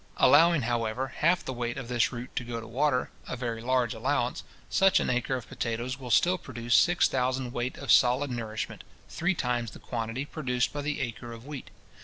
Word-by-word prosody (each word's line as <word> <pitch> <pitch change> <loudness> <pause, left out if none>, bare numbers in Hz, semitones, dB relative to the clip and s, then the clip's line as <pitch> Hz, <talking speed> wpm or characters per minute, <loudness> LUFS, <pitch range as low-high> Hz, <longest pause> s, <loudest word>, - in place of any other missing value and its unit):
Allowing, 165 -4 +6
however, 120 +2 -1
half 170 +3 +2
the 130 - -3
weight 120 -1 -3
of 135 -3 -5
this 120 -1 +1
root 125 0 -7
to - - -1
go 120 -1 -4
to 115 - -9
water, 130 +3 0 0.2
a - - -3
very 115 -2 -3
large 125 -1 +1
allowance, 125 +2 -1 0.2
such 195 0 +4
an - - 0
acre 125 +1 0
of 125 -2 -6
potatoes 120 +2 -3
will 125 -2 -7
still 180 +10 +4
produce 120 -2 -3
six 175 +5 +5
thousand 130 -1 -1
weight 120 +2 -3
of 140 -5 -1
solid 125 +4 +4
nourishment, 110 -2 -4 0.3
three 175 +3 0
times 120 -5 -1
the - - -12
quantity 115 +3 -4
produced 125 -5 -1
by 145 - -3
the 150 0 -2
acre 120 -1 -5
of 115 +1 -10
wheat. 145 -3 -7
125 Hz, 200 wpm, -28 LUFS, 120-135 Hz, 0.3 s, Allowing